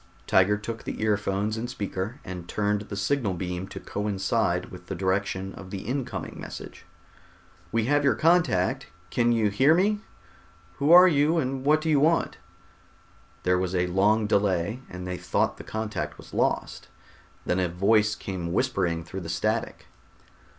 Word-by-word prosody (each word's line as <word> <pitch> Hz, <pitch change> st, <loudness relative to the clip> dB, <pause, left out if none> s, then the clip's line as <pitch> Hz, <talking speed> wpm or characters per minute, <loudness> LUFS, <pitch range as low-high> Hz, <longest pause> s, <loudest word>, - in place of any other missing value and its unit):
Tiger 95 Hz, +2 st, +4 dB
took 115 Hz, +2 st, -6 dB
the -, -, -5 dB
earphones 105 Hz, 0 st, 0 dB
and 120 Hz, +2 st, -4 dB
speaker, 105 Hz, +2 st, -4 dB
and 90 Hz, -2 st, -7 dB
turned 105 Hz, -1 st, 0 dB
the 105 Hz, -1 st, -7 dB
signal 100 Hz, 0 st, 0 dB
beam 90 Hz, +1 st, -4 dB
to -, -, -8 dB
coincide 100 Hz, -2 st, -1 dB
with 90 Hz, -1 st, -11 dB
the -, -, -4 dB
direction 95 Hz, 0 st, -1 dB
of 95 Hz, -, -10 dB
the 95 Hz, 0 st, -6 dB
incoming 120 Hz, -3 st, -4 dB
message. -, -, -9 dB, 0.8 s
"We 115 Hz, -1 st, +1 dB
have 145 Hz, +3 st, +2 dB
your 140 Hz, -, +3 dB
contact. 160 Hz, -, +2 dB, 0.2 s
Can 120 Hz, -1 st, +2 dB
you 110 Hz, -3 st, +2 dB
hear 135 Hz, +10 st, +4 dB
me? 205 Hz, +4 st, +2 dB, 0.8 s
Who 145 Hz, +3 st, +2 dB
are 180 Hz, +1 st, +10 dB
you 155 Hz, 0 st, +3 dB
and 130 Hz, -3 st, -1 dB
what 155 Hz, +2 st, +3 dB
do 160 Hz, -, -1 dB
you 145 Hz, -, +4 dB
want?" 165 Hz, +3 st, +2 dB, 1.0 s
There 90 Hz, 0 st, +2 dB
was 95 Hz, 0 st, -2 dB
a 90 Hz, 0 st, +2 dB
long 100 Hz, +5 st, +2 dB
delay 100 Hz, +2 st, +1 dB
and 90 Hz, 0 st, -7 dB
they 90 Hz, 0 st, -4 dB
thought -, -, 0 dB
the -, -, -9 dB
contact 110 Hz, -1 st, -4 dB
was -, -, -14 dB
lost. -, -, -1 dB, 0.6 s
Then 90 Hz, -, +1 dB
a 90 Hz, -1 st, +1 dB
voice 105 Hz, +5 st, +2 dB
came 90 Hz, -3 st, -5 dB
whispering 90 Hz, -7 st, 0 dB
through 95 Hz, +4 st, -7 dB
the 80 Hz, -, -7 dB
static. 110 Hz, +6 st, -2 dB
105 Hz, 165 wpm, -26 LUFS, 95-125 Hz, 1.0 s, are